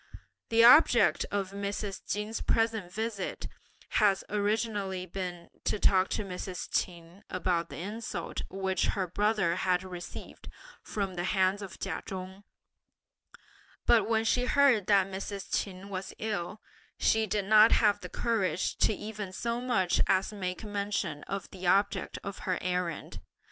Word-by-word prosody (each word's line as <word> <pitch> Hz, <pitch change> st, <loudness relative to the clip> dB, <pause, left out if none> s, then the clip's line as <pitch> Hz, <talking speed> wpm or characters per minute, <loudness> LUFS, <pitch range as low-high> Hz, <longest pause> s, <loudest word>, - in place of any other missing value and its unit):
The 230 Hz, 0 st, +5 dB
object 235 Hz, -, +6 dB
of 195 Hz, -2 st, -2 dB
Mrs. 200 Hz, 0 st, -4 dB
Chin's 210 Hz, +2 st, -2 dB
present 225 Hz, -5 st, 0 dB
visit 220 Hz, -2 st, -3 dB, 0.4 s
had 200 Hz, -2 st, +4 dB
originally 205 Hz, -3 st, -1 dB
been 180 Hz, -1 st, -6 dB
to -, -, +1 dB
talk 190 Hz, -2 st, +3 dB
to 210 Hz, -, -2 dB
Mrs. 180 Hz, -1 st, -5 dB
Ch'in 170 Hz, +1 st, -3 dB
about 180 Hz, -2 st, -1 dB
the -, -, -8 dB
insult 200 Hz, -1 st, -5 dB
which 190 Hz, -1 st, -1 dB
her 190 Hz, -, +1 dB
brother 195 Hz, -1 st, +1 dB
had 185 Hz, -1 st, +1 dB
received 180 Hz, -2 st, -9 dB, 0.3 s
from 200 Hz, -3 st, -3 dB
the 175 Hz, -1 st, -3 dB
hands 190 Hz, +1 st, +2 dB
of 195 Hz, -3 st, -8 dB
Ch'in -, -, -3 dB
Chung, 190 Hz, +1 st, -7 dB, 1.4 s
but 230 Hz, -1 st, +4 dB
when 225 Hz, -1 st, +2 dB
she 250 Hz, +2 st, +2 dB
heard 255 Hz, -8 st, +4 dB
that 200 Hz, -2 st, +5 dB
Mrs. 195 Hz, 0 st, -6 dB
Ch'in 195 Hz, 0 st, -2 dB
was 185 Hz, -1 st, -5 dB
ill, 210 Hz, -1 st, -3 dB, 0.4 s
she 220 Hz, 0 st, +2 dB
did 205 Hz, 0 st, -1 dB
not 215 Hz, +2 st, +7 dB
have 205 Hz, -2 st, +4 dB
the 180 Hz, -, -8 dB
courage 205 Hz, -6 st, 0 dB
to -, -, +3 dB
even 210 Hz, -2 st, -6 dB
so 235 Hz, +5 st, -2 dB
much 195 Hz, -8 st, +1 dB
as 190 Hz, +3 st, +2 dB
make 185 Hz, -1 st, -4 dB
mention 200 Hz, -7 st, -2 dB
of 195 Hz, -1 st, -4 dB
the 185 Hz, -1 st, -5 dB
object 200 Hz, +3 st, +2 dB
of 200 Hz, -1 st, -6 dB
her 185 Hz, -1 st, -1 dB
errand. 180 Hz, -3 st, -3 dB
195 Hz, 145 wpm, -30 LUFS, 185-215 Hz, 1.4 s, not